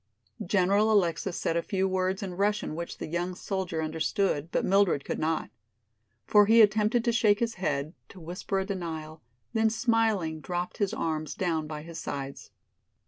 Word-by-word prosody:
General 200 +3 +3
Alexis 175 -3 +1
said 165 - -1
a 170 - +2
few 190 +2 0
words 190 +1 -1
in 185 -2 -4
Russian 205 -1 0
which 170 +2 -5
the - - -5
young 175 +3 -2
soldier 180 -4 -3
understood, 160 0 -1
but - - 0
Mildred 195 -7 +3
could - - -3
not. 160 0 -1 0.7
For 210 -1 +5
he 225 +2 +6
attempted 215 +3 +2
to 235 - +3
shake 215 -3 +3
his 230 -1 0
head, 150 -2 -1 0.2
to 190 - -13
whisper 180 +4 -4
a 190 - 0
denial, 160 -5 -5 0.3
then 220 -1 +3
smiling 220 -8 +1
dropped 175 +3 -4
his 200 -1 0
arms 155 -8 -2
down 165 -4 -1
by 150 -1 -6
his 165 0 -8
sides. 140 -1 -6
185 Hz, 170 wpm, -28 LUFS, 160-205 Hz, 0.7 s, he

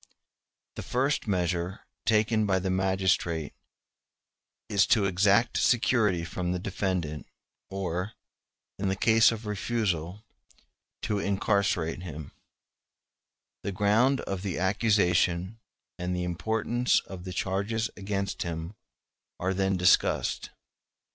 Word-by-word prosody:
The - - -3
first 135 +1 0
measure 90 0 -1 0.3
taken 110 0 +3
by 95 -1 +2
the 95 0 -1
magistrate 95 -4 0 1.1
is 100 -1 +3
to 105 -3 +4
exact 100 +4 +3
security 110 -7 +2
from 90 +1 -3
the - - -1
defendant, 90 -5 -3 0.4
or, 95 +1 -3 0.7
in 95 -1 0
case 110 +2 +5
of 115 -1 -6
refusal, 105 -3 -2 0.8
to 105 -1 0
incarcerate 100 -4 0
him: 80 -5 -8 1.3
the 100 - -3
ground 110 +8 +3
of 95 -2 -4
the 95 -3 -3
accusation 95 -1 +1 0.4
and 90 +1 -2
the 90 - -2
importance 110 +7 0
of 95 -2 -10
the 90 - -6
charges 100 +5 -1
against 100 0 -3
him 85 +1 -4 0.7
are 95 +2 0
then 95 0 +1
discussed. 90 0 +2
95 Hz, 110 wpm, -28 LUFS, 90-105 Hz, 1.3 s, case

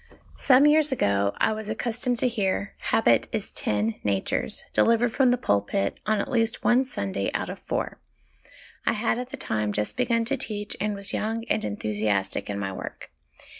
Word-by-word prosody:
Some 270 +1 +6
years 300 0 +5
ago 100 - +1
I 220 - +2
was 215 0 -6
accustomed 240 +2 -1
to 250 - +2
hear, 200 -4 -1
' - - -39
Habit 120 - +4
is - - -3
TEN 105 +1 -1
natures/ 100 -2 0
delivered 230 0 +3
from 265 -2 +4
the 245 - +3
pulpit 100 - 0
on 215 -1 +2
at - - -3
least 230 -1 +1
one 250 +2 +4
Sunday 100 - -2
out - - -2
of - - -8
four. - - -3 0.8
I - - +2
had 230 +2 0
at 250 0 -5
the - - -7
time 105 -1 -1
just 105 0 -2
begun 235 -2 +1
to 275 +4 -1
teach, 210 -5 -3
and 210 0 0
was 200 0 -2
young 225 +1 -2
and - - +1
enthusiastic 105 -1 -1
in 100 - -2
my 95 -1 -3
work. - - -8
215 Hz, 185 wpm, -26 LUFS, -, 0.8 s, Some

